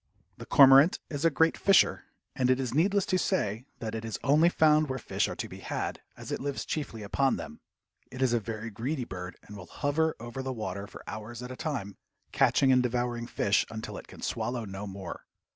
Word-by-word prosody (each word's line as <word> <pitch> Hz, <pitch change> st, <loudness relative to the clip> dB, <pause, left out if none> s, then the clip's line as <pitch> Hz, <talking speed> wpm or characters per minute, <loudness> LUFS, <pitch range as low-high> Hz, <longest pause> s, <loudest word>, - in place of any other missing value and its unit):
The -, -, -10 dB
cormorant 135 Hz, +4 st, +7 dB
is 145 Hz, +1 st, -2 dB
a -, -, +7 dB
great 160 Hz, +2 st, +3 dB
fisher, 195 Hz, -3 st, +4 dB, 0.3 s
and 125 Hz, -1 st, +1 dB
it 130 Hz, 0 st, +3 dB
is 125 Hz, -3 st, -2 dB
needless 195 Hz, +6 st, +2 dB
to 185 Hz, -, +1 dB
say 125 Hz, -, -1 dB
that 115 Hz, -3 st, -5 dB
it 110 Hz, 0 st, -4 dB
is 110 Hz, -1 st, -4 dB
only 150 Hz, +6 st, +5 dB
found 155 Hz, -3 st, +4 dB
where 130 Hz, -, -2 dB
fish -, -, -1 dB
are -, -, -5 dB
to -, -, -4 dB
be -, -, -10 dB
had, -, -, -4 dB, 0.2 s
as -, -, -8 dB
it -, -, -2 dB
lives 140 Hz, 0 st, -3 dB
chiefly 125 Hz, -8 st, -4 dB
upon 135 Hz, +6 st, +1 dB
them. 75 Hz, -, -8 dB, 0.5 s
It 130 Hz, -, -9 dB
is 130 Hz, -2 st, +2 dB
a 120 Hz, -, +3 dB
very 110 Hz, +1 st, -6 dB
greedy 125 Hz, +5 st, -3 dB
bird, 90 Hz, -3 st, -7 dB
and 105 Hz, -, -11 dB
will 95 Hz, -2 st, -10 dB
hover 155 Hz, +2 st, 0 dB
over 120 Hz, +3 st, -6 dB
the 130 Hz, 0 st, -3 dB
water 100 Hz, -3 st, -5 dB
for -, -, -12 dB
hours 110 Hz, +3 st, -7 dB
at 125 Hz, -, -7 dB
a -, -, -6 dB
time, 120 Hz, -10 st, -4 dB, 0.3 s
catching 135 Hz, -1 st, +4 dB
and 130 Hz, -1 st, +5 dB
devouring 120 Hz, -1 st, -1 dB
fish 105 Hz, -3 st, +2 dB
until 110 Hz, 0 st, -6 dB
it -, -, -9 dB
can -, -, -12 dB
swallow 115 Hz, +1 st, -2 dB
no 100 Hz, +1 st, -6 dB
more. 95 Hz, -1 st, -8 dB
125 Hz, 215 wpm, -29 LUFS, 110-145 Hz, 0.5 s, cormorant